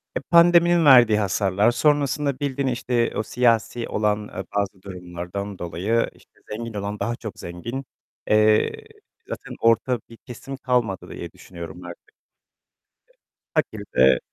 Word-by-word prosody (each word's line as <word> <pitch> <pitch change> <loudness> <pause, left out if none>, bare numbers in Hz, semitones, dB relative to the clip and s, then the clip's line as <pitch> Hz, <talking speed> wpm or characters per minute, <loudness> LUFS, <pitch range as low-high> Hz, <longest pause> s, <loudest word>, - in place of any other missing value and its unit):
Eee, - - -1
pandeminin 170 -1 +6
verdiği 120 -6 +7
hasarlar. 100 +2 +2
Sonrasında 145 0 +1
bildiğin 140 -1 -1
işte 120 -1 0
o 110 - -1
siyasi 120 0 +1
olan, 105 -1 +1
ııı, 95 -2 -7
bazı 100 -2 -2
durumlardan 90 +1 -7
dolayı 95 +7 -1
işte - - -25
zengin 115 +1 -5
olan 100 0 -4
daha 120 - -1
çok 110 -4 -8
zengin. 120 +10 -6 0.4
Eee, 110 - +3 0.4
zaten - - -7
orta 115 +2 +2
bir 115 - -13
kesim 135 +2 -9
kalmadı 125 -7 -1
diye - - -7
düşünüyorum 90 0 -10
artık. 85 - -11
Eee, - - -67 1.4
fakir 110 -9 -1
de 65 0 +6
115 Hz, 135 wpm, -23 LUFS, 100-130 Hz, 1.4 s, verdiği